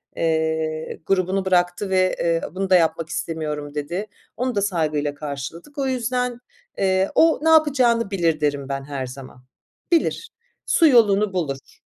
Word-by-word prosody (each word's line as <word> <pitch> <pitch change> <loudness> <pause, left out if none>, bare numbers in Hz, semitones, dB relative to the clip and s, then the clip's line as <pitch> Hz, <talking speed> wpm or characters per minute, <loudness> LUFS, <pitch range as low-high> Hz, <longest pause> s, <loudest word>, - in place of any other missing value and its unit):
Eee, 160 -1 -1
grubunu 190 0 0
bıraktı 180 +1 +1
ve, 185 -1 +2
eee, 165 -1 +1
bunu 190 0 -2
da 185 - +6
yapmak 165 -1 +1
istemiyorum 150 -3 -4
dedi. 170 +8 -3 0.3
Onu 250 0 -1
da 200 - +1
saygıyla 155 -7 -1
karşıladık. 150 - -7
O 275 -1 0
yüzden, 250 -1 -1 0.4
eee, 190 0 +1
o 325 -1 +4
ne 320 - +3
yapacağını 255 -9 +3
bilir 165 -5 0
derim 145 -2 -1
ben 135 0 -3
her 135 -2 -5
zaman. 130 -1 -11 0.5
Bilir. 345 +6 +1 0.4
Su 330 - +4
yolunu 210 -6 +4
bulur. 140 -7 -4
175 Hz, 145 wpm, -22 LUFS, 150-215 Hz, 0.5 s, da